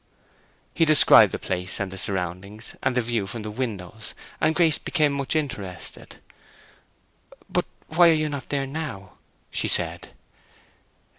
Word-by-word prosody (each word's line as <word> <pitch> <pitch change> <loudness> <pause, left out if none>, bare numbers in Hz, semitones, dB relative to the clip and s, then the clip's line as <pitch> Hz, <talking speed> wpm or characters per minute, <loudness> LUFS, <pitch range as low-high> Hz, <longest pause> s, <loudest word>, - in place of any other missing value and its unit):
He - - +2
described 155 -2 +7
the - - -3
place, 90 0 -2
and 100 -2 -3
the 95 - -8
surroundings, 95 +3 -4
and 130 -1 0
the 125 - +2
view 115 -4 -1
from 110 +1 -6
the 105 - -5
windows, 105 -3 -5 0.3
and 155 +1 +2
Grace 165 -4 +3
became 150 -4 +1
much 140 +2 -2
interested. 115 - -5 1.3
"But - - 0 0.2
why 170 +2 +5
are - - +6
you 155 -1 +1
not 140 -3 -6
there 140 -1 -1
now?" 135 -10 -6 0.3
she - - +1
said. - - +1
120 Hz, 145 wpm, -24 LUFS, 100-150 Hz, 1.3 s, described